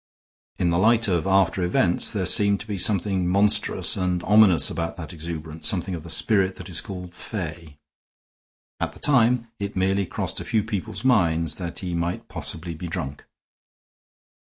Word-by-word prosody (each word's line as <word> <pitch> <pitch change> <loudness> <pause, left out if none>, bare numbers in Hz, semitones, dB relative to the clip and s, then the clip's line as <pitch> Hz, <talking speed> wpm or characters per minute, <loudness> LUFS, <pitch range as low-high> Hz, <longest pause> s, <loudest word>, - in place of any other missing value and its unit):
In 85 - +1
the 85 - +1
light 115 +3 +4
of 90 -1 0
after 95 -1 +2
events 90 0 +2
there 100 -3 -2
seemed 100 +2 +3
to - - -8
be 105 -3 -4
something 95 -1 +1
monstrous 100 -1 +2
and 90 -2 -1
ominous 105 -3 +5
about 85 +1 -4
that 85 0 -8
exuberance, 80 -1 -5
something 95 -1 +1
of 85 - -5
the 85 - -11
spirit 95 +1 +2
that 90 0 -10
is 90 - -1
called 90 -2 -8
fey. 80 -7 -7 1.0
At - - -2
the - - -15
time 120 -4 +3
it 100 0 -4
merely 95 +1 +1
crossed - - -4
a - - -5
few 110 -2 0
people's 110 +3 -5
minds 85 - +2
that 85 -3 -6
he 90 - -3
might 85 +1 -3
possibly 85 +1 -5
be 80 +2 -7
drunk. 80 -5 -5
90 Hz, 170 wpm, -24 LUFS, 85-100 Hz, 1.0 s, ominous